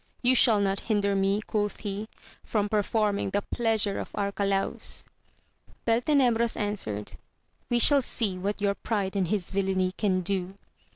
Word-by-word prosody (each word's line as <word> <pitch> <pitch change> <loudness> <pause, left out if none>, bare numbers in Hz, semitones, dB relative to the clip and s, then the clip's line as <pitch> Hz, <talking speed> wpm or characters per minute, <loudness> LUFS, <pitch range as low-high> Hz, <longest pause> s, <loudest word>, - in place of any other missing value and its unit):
You 250 +1 +5
shall 230 -4 +5
not 195 -1 0
hinder 200 -2 +2
me, 195 +2 +1
quoth 210 -1 -2
he, 205 +1 -4 0.4
from 210 -2 -1
performing 210 -1 0
the 205 +1 -1
pleasure 220 -3 0
of - - -6
Arcalaus. 200 -1 -2 0.8
Beltenebros 235 -1 +2
answered. 190 - -3 0.6
We 240 - +2
shall 280 +4 +6
see 220 -6 +1
what 200 +3 -3
your 200 -1 +2
pride 200 -2 -2
and 190 -3 +1
his 195 -1 -2
villainy 190 -1 0
can 190 -1 0
do. 190 0 -3
205 Hz, 140 wpm, -27 LUFS, 195-220 Hz, 0.8 s, shall